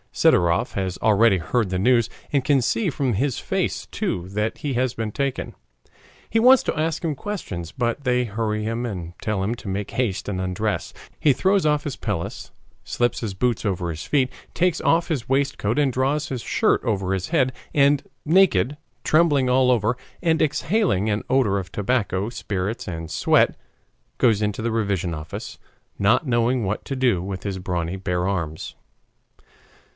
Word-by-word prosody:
Sidorov 85 0 +3
has 95 -2 -2
already 110 -1 +4
heard 95 +5 0
the 90 0 -1
news, 120 +2 +3 0.2
and 140 -2 +2
can 135 -1 +3
see 190 - +1
from 135 -4 -1
his 130 +6 0
face - - -2
too 90 0 -3
that 105 +3 -2
he 145 -2 -3
has 125 0 0
been 110 -1 -3
taken. 140 +3 -2 0.7
He 225 - +1
wants 255 +2 +7
to - - -2
ask 160 +1 -1
him 160 -2 0
questions, 115 - -5
but 120 +7 -2
they 125 -1 +2
hurry 110 -1 -2
him 115 +2 -2
and 90 -7 -5
tell 105 -3 -1
him 105 +4 0
to 115 - -11
make 100 +1 -3
haste 105 -7 -1
and 95 -3 -2
undress. 95 +3 -2 0.3
He 145 - +4
throws 190 +6 +2
off 150 -1 +1
his 145 - -3
pelisse, - - -4 0.3
slips 120 0 -1
his 105 -5 -4
boots 120 +3 0
off 100 -5 -1
his 85 -2 -4
feet, 135 -3 +1 0.3
takes 180 -1 +1
off 165 +1 +2
his 135 -8 -3
waistcoat 135 -5 0
and 140 -3 +2
draws 140 +4 0
his 130 -3 -3
shirt - - +1
over 95 -4 0
his 95 -1 -2
head, 130 -6 +2 0.2
and 140 0 +4 0.2
naked, 150 - +3 0.3
trembling 150 -5 +3
all 130 0 +4
over, 115 0 +2 0.3
and 165 -2 +2
exhaling 155 - +1
an 105 0 -1
odor 120 -7 +2
of 90 -1 -8
tobacco, 105 -3 0
spirits, 105 -2 -3
and 80 -2 -5
sweat, 80 - +3 0.6
goes 110 - +3
into 105 +1 -1
the 115 - 0
revision 100 -6 -1
office, 75 0 -7 0.4
not 115 +10 +3
knowing 120 -1 +1
what 100 +3 -2
to 135 - -3
do 125 -9 +2
with 95 0 -5
his 100 -2 -3
brawny 90 -1 -2
bare 90 -1 -1
arms. 85 -5 -3
115 Hz, 175 wpm, -23 LUFS, 95-135 Hz, 0.7 s, wants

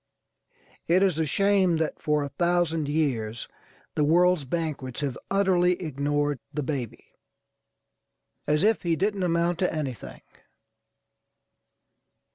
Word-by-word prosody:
It 180 +3 +4
is 180 -5 +1
a 160 - +1
shame 195 -1 +2
that 160 -1 -2
for 150 -1 +1
a 140 - -4
thousand 165 -1 0
years 120 -8 -1 0.5
the 150 - +1
world's 175 0 +3
banquets 145 -4 -3
have 140 -4 -2
utterly 185 -2 +3
ignored 145 -3 -1
the 150 - -3
baby, 130 -6 -4 1.4
as 150 +3 +2
if 220 +1 +3
he 170 -2 +1
didn't 200 +3 -1
amount 170 -1 +1
to 180 - +1
anything. 130 - -5
160 Hz, 115 wpm, -26 LUFS, 145-180 Hz, 1.4 s, It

